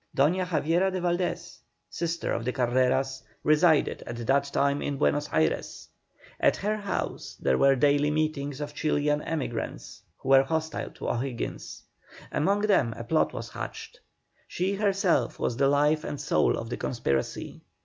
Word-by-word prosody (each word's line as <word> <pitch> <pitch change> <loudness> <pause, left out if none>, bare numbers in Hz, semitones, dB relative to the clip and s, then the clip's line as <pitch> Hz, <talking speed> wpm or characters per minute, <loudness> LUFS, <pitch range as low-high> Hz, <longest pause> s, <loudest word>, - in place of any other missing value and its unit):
Doña 180 +7 +3
Javiera 170 +3 +1
de 185 - -2
Valdés, 175 0 -2 0.3
sister 170 0 -3
of 115 - -2
the 125 - -1
Carreras, 130 +1 +1 0.2
resided 155 0 +3
at 120 - -5
that 140 +2 +3
time 140 0 0
in 140 - -2
Buenos 145 +2 +1
Ayres. 80 -1 -1 0.5
At - - +3
her 210 +2 -1
house 205 -2 -4
there 65 - +1
were 135 0 +5
daily 145 +2 +3
meetings 150 -2 -1
of 145 0 -5
Chilian 150 0 0
emigrants 135 -9 -4 0.2
who 135 - -7
were 135 0 +8
hostile 160 +3 -2
to - - -8
O'Higgins. 120 0 -4 0.5
Among 200 +7 +1
them 170 - +2
a 115 - -5
plot 155 +6 +1
was - - -6
hatched. - - -7 0.5
She 185 +3 -1
herself 195 - +1
was 120 - -1
the 135 - +3
life 150 +2 +3
and 145 - -5
soul 145 - +2
of 115 +1 -6
the - - -2
conspiracy. 70 - -2
145 Hz, 155 wpm, -27 LUFS, 135-170 Hz, 0.5 s, were